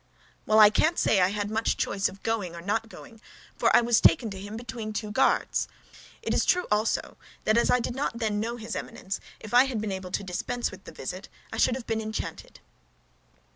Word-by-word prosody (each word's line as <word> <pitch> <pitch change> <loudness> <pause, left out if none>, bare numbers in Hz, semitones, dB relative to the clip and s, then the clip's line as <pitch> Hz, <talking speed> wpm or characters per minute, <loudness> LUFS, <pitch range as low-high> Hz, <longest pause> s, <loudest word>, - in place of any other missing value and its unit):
"Well, 215 0 +5
I 210 -1 +9
can't 320 +9 +2
say 195 - +3
I 180 - +5
had 205 +1 -3
much 225 +1 0
choice 195 0 0
of 195 - -14
going 205 -7 -2
or 170 - -7
not 225 +4 -1
going, 225 -1 -13 0.3
for - - +3
I - - +7
was 235 -1 +3
taken 225 -4 +4
to 195 - -7
him 205 +3 -7
between 230 -2 -6
two 210 0 -3
guards. 260 - +2 0.6
It - - -1
is - - +2
true 360 0 +2
also, 210 +1 0 0.3
that 215 - +3
as 235 - +3
I 250 - +4
did 240 - -3
not 265 -2 -2
then 215 -3 -1
know 230 +3 -2
his 225 -1 -6
Eminence, 195 +1 -5 0.2
if 215 +1 -10
I 250 +2 +7
had 255 -5 -2
been 210 -1 -3
able 190 -1 -5
to 190 - -2
dispense 235 +6 -3
with - - -13
the - - -9
visit, - - -7 0.2
I - - -4
should 250 - +3
have 255 -3 -6
been 225 -1 -1
enchanted." 220 0 -6
220 Hz, 220 wpm, -27 LUFS, 205-235 Hz, 0.6 s, I